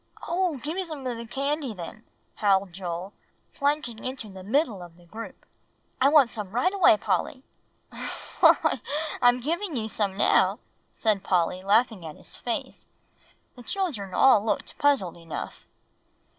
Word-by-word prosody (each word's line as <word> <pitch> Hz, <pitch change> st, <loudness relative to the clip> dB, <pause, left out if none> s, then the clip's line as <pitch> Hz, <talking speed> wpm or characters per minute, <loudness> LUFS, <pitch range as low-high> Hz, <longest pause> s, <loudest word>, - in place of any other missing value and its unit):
"Oh! 345 Hz, -2 st, 0 dB
give 295 Hz, +5 st, -4 dB
me 380 Hz, -, 0 dB
some 310 Hz, -6 st, -7 dB
of 245 Hz, -2 st, -2 dB
the 230 Hz, 0 st, -7 dB
candy 275 Hz, -1 st, -2 dB
then," 185 Hz, +5 st, -8 dB, 0.3 s
howled 195 Hz, -3 st, +2 dB
Joel, 180 Hz, +1 st, -5 dB, 0.4 s
plunging 280 Hz, -6 st, -1 dB
into 255 Hz, -4 st, -5 dB
the 190 Hz, -1 st, -10 dB
middle 220 Hz, -, 0 dB
of 175 Hz, -1 st, -12 dB
the 175 Hz, -, -19 dB
group. 225 Hz, +6 st, -9 dB, 0.6 s
"I 270 Hz, -, +6 dB
want 285 Hz, -5 st, +5 dB
some 210 Hz, -4 st, -4 dB
right 250 Hz, -, +1 dB
away, 370 Hz, -, +6 dB
Polly." 260 Hz, +5 st, -1 dB, 1.0 s
"Why, -, -, +5 dB, 0.4 s
I'm 245 Hz, 0 st, +5 dB
giving 335 Hz, +5 st, -2 dB
you 220 Hz, -3 st, -2 dB
some 200 Hz, -3 st, -1 dB
now," -, -, +4 dB, 0.3 s
said 215 Hz, -4 st, 0 dB
Polly, 180 Hz, -1 st, +1 dB
laughing 210 Hz, 0 st, +2 dB
at 155 Hz, -2 st, -7 dB
his -, -, -10 dB
face. 235 Hz, -2 st, -5 dB, 0.7 s
The 250 Hz, -, -12 dB
children 245 Hz, -, -3 dB
all 255 Hz, -6 st, +6 dB
looked 220 Hz, -, -2 dB
puzzled 270 Hz, -, +2 dB
enough. 165 Hz, -2 st, -7 dB
230 Hz, 150 wpm, -26 LUFS, 195-280 Hz, 1.0 s, I